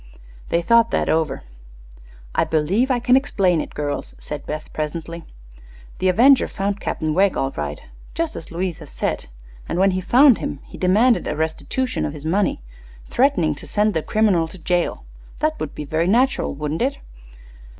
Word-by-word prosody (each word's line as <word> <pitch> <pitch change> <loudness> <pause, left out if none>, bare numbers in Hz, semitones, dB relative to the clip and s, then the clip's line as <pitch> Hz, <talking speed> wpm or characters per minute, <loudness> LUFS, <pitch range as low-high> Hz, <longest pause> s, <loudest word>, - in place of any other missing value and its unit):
They 170 0 +1
thought 230 +3 +4
that - - 0
over. 160 -3 0 0.9
"I - - +2
believe 180 - +1
I 255 - +2
can 250 +1 +3
explain 190 - +2
it, - - -8
girls," 145 -1 -4
said 150 -2 -7
Beth, 155 +1 -6
presently. 165 +2 -5 0.7
"The 185 - +1
avenger 255 +8 +5
found 200 +1 -3
Captain 155 -1 -2
Wegg, 190 +3 +3
all 135 0 0
right - - -4 0.4
just 330 -1 -2
as 165 - -8
Louise 175 0 -3
has 150 -3 -11
said - - -3 0.4
and - - -2
when 195 +1 +4
he 185 0 -1
found 255 +6 +5
him 145 - -4
he - - -12
demanded 220 +7 +3
a 150 - -2
restitution 250 - -2
of 145 - -2
his 150 -1 -9
money, 185 - 0 0.5
threatening 245 - +2
to 145 - -11
send 210 0 +1
the 160 - 0
criminal 195 -4 +2
to 165 - -11
jail. 175 +1 -1 0.3
That 310 +1 -1
would 150 - -5
be 150 - -5
very 160 +4 0
natural, 250 +7 +2
wouldn't 150 +2 -3
it? 270 +3 0
180 Hz, 175 wpm, -21 LUFS, 155-235 Hz, 0.9 s, avenger